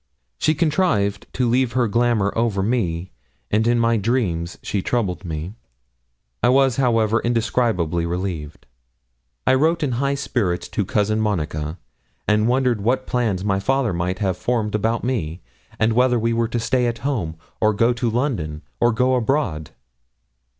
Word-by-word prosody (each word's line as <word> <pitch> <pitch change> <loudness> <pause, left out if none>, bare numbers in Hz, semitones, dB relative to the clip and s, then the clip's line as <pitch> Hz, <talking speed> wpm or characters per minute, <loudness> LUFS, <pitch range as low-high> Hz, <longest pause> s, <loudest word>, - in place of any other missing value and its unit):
She 155 - +2
contrived 145 - +1
to 125 -1 +1
leave 125 +1 +2
her 125 -1 +2
glamour 115 -2 +1
over 110 -4 +1
me, 95 -6 -1 0.4
and 110 +2 +2
in 120 0 +3
my 115 0 +3
dreams 95 -7 -1
she 100 - -1
troubled 100 -4 -1
me. 80 +2 -5 0.9
I 120 - +4
was, 135 -1 +3
however, 115 -4 +2
indescribably 110 -8 0
relieved. 85 -4 -4 0.8
I - - +4
wrote 160 +5 +2
in 140 - 0
high 140 +3 0
spirits 95 -10 -1
to 105 - -1
Cousin 105 +2 +1
Monica; 80 -6 -2 0.5
and 105 +1 +3
wondered 125 -3 +2
what 130 +5 +1
plans 110 -7 0
my 95 -1 +1
father 125 +1 +1
might 90 +2 -1
have 95 -2 -1
formed 110 -2 -1
about 110 +2 0
me, 95 -10 -2 0.4
and 110 +1 +2
whether 125 +1 +3
we 115 +1 0
were 115 0 +1
to 120 +1 -2
stay 125 +2 +1
at 120 +2 -4
home, 100 - -1 0.2
or 110 - +3
go 115 +3 +2
to 120 0 -1
London, 110 - -2 0.2
or 120 - +4
go 125 +3 +2
abroad. 115 - 0
115 Hz, 155 wpm, -21 LUFS, 95-125 Hz, 0.9 s, I